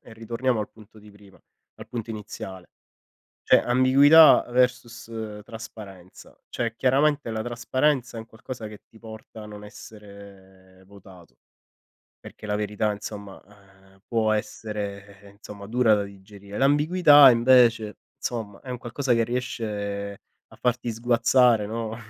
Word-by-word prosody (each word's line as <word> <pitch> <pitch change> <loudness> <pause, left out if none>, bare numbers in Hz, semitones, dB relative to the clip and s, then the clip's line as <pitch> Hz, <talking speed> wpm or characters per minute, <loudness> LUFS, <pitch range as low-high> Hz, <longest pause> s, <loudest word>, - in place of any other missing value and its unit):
e 115 - -16
ritorniamo 115 +1 -2
al 105 - -5
punto 110 0 -18
di 105 0 -16
prima, 100 -1 -19 0.4
al - - -12
punto 115 -2 -6
iniziale. 95 -4 -8 0.8
Cioè - - +5
ambiguità 135 +6 +6
versus 115 -3 -2
trasparenza, 105 -5 -12
cioè 115 -1 -3
chiaramente 140 +2 +1
la 110 - -3
trasparenza, 120 +1 -1
è - - -5
un 110 - -9
qualcosa 115 0 -9
che 105 -1 -12
ti 115 - -20
porta 110 0 -12
a - - -10
non 105 -1 -11
essere 100 -3 -15
votato, 95 -3 -17 0.8
perché - - -13
la 105 - -2
verità, 105 0 -1
insomma, 100 -1 -9 0.5
ehm, 95 - -25
può 110 -2 0
essere, 100 -2 -5
ehm, 100 - -16
insomma 100 0 -12
dura 115 -2 +3
da 100 - -1
digerire. 100 +1 -12
L'ambiguità 145 +1 +6
invece, 115 -3 +3 0.2
insomma, 110 -5 -6
è 130 - -12
un 125 - -4
qualcosa 125 +2 -2
che 115 -1 +2
riesce 105 -5 -4 0.3
a - - -18
farti 125 -1 -2
sguazzare, 120 0 +2
no, 110 +1 -5
110 Hz, 140 wpm, -24 LUFS, 100-120 Hz, 0.8 s, ambiguità